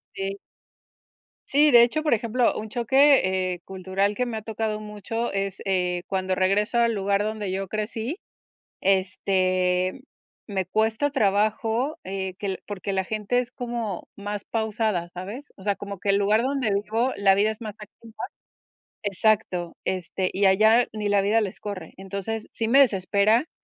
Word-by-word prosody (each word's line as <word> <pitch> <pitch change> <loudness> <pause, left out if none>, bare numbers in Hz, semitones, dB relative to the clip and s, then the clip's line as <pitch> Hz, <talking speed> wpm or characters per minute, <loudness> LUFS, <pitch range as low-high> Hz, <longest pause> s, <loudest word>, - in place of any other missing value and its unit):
Sí. 195 0 -3 1.1
Sí, 295 +1 +4
de 240 -2 +9
hecho, 310 +6 +1
por 300 - +3
ejemplo, 235 +2 +1
un 215 0 -5
choque, 235 -7 +3
eh, 175 - -8
cultural 190 +2 -1
que 250 - 0
me 235 -2 -4
ha - - -5
tocado 220 0 -3
mucho 215 +2 -4
es, 195 -1 -2
eh, 180 -2 0
cuando 190 -1 -1
regreso 200 +5 +1
al 235 -1 +3
lugar 200 0 +1
donde 215 -2 -3
yo 195 0 -2
crecí, 220 - -3 0.6
este, 185 0 +1 0.4
me 195 -3 -2
cuesta 220 +8 +1
trabajo, 220 +3 +1
eh, 190 -1 -4
que 195 -1 -3
porque 200 -1 -4
la 190 -1 0
gente 215 +4 0
es 245 -1 -4
como 235 -6 -4
más 205 0 -5
pausada, 220 -5 -1
¿sabes? 205 +11 -7
O 190 - -14
sea, 205 0 +1
como 200 -2 -7
que 200 - -3
el 200 - +5
lugar 205 +2 +3
donde 265 -4 0
vivo, 220 +5 0
la 200 -1 +4
vida 205 +2 +3
es 220 - -10
más 215 -2 -6
activa. 220 +2 -14 0.9
Exacto, 200 -3 +1
este, 185 0 -2
y 200 +1 +1
allá 220 +5 +5
ni 210 -1 -2
la 205 0 +4
vida 210 +3 +3
les 200 -3 -4
corre. 195 -6 -6
Entonces, 200 +3 -5
sí 225 - -2
me 270 +4 +6
desespera, 215 - +3
205 Hz, 160 wpm, -25 LUFS, 190-225 Hz, 1.1 s, de